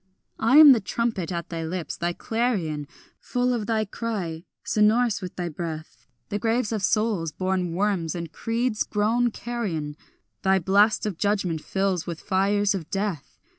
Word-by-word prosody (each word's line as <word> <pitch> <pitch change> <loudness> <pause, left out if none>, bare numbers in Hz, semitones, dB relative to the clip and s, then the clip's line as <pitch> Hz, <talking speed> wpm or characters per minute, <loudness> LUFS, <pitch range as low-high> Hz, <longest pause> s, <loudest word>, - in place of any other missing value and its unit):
I 235 +6 +4
am 305 -2 +11
the 245 - +5
trumpet 215 -3 -2
at 170 -1 -4
thy 165 -1 -4
lips, 170 +1 -4
thy 175 +1 -1
clarion 180 - -1 0.3
Full 250 0 0
of 220 -4 -2
thy 220 -1 +1
cry, 195 -6 -4 0.2
sonorous 215 +1 +2
with 180 -1 -7
thy 175 -1 -3
breath; 160 -1 -7 0.2
The 205 - -2
graves 230 +1 0
of 220 -2 -1
souls 200 -5 +1
born 185 0 -1
worms 185 -5 0
and 170 -2 -5
creeds 230 +1 -1
grown 225 +4 +1
carrion 200 -12 -4 0.5
Thy 190 0 +3
blast 200 +5 +3
of 200 -6 -3
judgment 195 -6 0
fills 190 -2 -1
with 170 -2 -4
fires 200 +1 +1
of 170 -5 -5
death. 195 -7 -3
200 Hz, 160 wpm, -25 LUFS, 170-225 Hz, 0.5 s, am